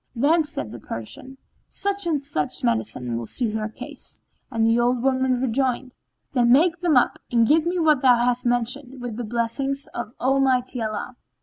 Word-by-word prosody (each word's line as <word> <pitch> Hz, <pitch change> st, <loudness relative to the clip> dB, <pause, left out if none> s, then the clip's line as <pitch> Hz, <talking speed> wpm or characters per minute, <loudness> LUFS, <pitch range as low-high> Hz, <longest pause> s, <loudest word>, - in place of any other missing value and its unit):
Then 305 Hz, +6 st, +3 dB
said 125 Hz, -, -5 dB
the 120 Hz, -, -8 dB
Persian, 185 Hz, -, -7 dB, 0.3 s
"Such 400 Hz, -2 st, -2 dB
and 300 Hz, -4 st, 0 dB
such 155 Hz, -, -1 dB
medicines 115 Hz, +1 st, -1 dB
will 115 Hz, -1 st, -4 dB
suit 235 Hz, -4 st, 0 dB
her 220 Hz, 0 st, -2 dB
case;" -, -, -8 dB, 0.3 s
and 225 Hz, -3 st, +1 dB
the 230 Hz, +1 st, +3 dB
old 240 Hz, 0 st, +1 dB
woman 260 Hz, -1 st, +2 dB
rejoined, 255 Hz, 0 st, -1 dB, 0.4 s
"Then 240 Hz, -2 st, +3 dB
make 330 Hz, +6 st, +4 dB
them 335 Hz, -6 st, +3 dB
up 245 Hz, -, +2 dB
and 235 Hz, -1 st, +4 dB
give 315 Hz, +3 st, +3 dB
me 360 Hz, +1 st, 0 dB
what 310 Hz, -5 st, +3 dB
thou 255 Hz, -3 st, +6 dB
hast 245 Hz, +1 st, +1 dB
mentioned, 250 Hz, +2 st, -1 dB
with 245 Hz, -3 st, -5 dB
the 245 Hz, -, -3 dB
blessing 235 Hz, +5 st, -1 dB, 0.2 s
of 235 Hz, -1 st, -5 dB
Almighty 260 Hz, -2 st, +1 dB
Allah." 215 Hz, +3 st, -4 dB
250 Hz, 180 wpm, -23 LUFS, 230-275 Hz, 0.4 s, thou